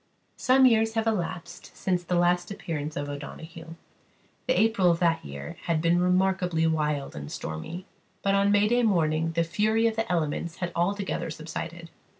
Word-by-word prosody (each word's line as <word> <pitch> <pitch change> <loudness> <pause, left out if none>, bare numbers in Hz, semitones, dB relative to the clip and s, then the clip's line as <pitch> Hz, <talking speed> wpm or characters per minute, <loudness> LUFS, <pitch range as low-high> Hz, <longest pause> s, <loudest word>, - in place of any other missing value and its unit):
Some 260 +1 +5
years 225 -2 +4
have 225 0 +1
elapsed 185 -6 -4
since 180 -2 0
the 175 +1 -1
last 175 0 +2
appearance 155 -6 -4
of 145 - -3
O'Donoghue. 160 +3 -8 0.7
The 255 - +3
April 215 -4 +3
of 170 - +3
that 170 -1 +1
year 70 0 -8
had 165 -2 +1
been 170 +2 +2
remarkably 180 -2 +2
wild 150 -3 -1
and 70 0 -7
stormy; 160 - -6 0.4
but 195 - +2
on 200 0 +3
May 210 +4 +3
morning 165 -6 +1
the 170 +1 +2
fury 215 +6 +1
of 225 -1 +2
the 225 -4 -2
elements 165 0 -1
had 175 -1 -4
altogether 195 +1 -1
subsided. 165 +1 -7
175 Hz, 160 wpm, -27 LUFS, 160-200 Hz, 0.7 s, Some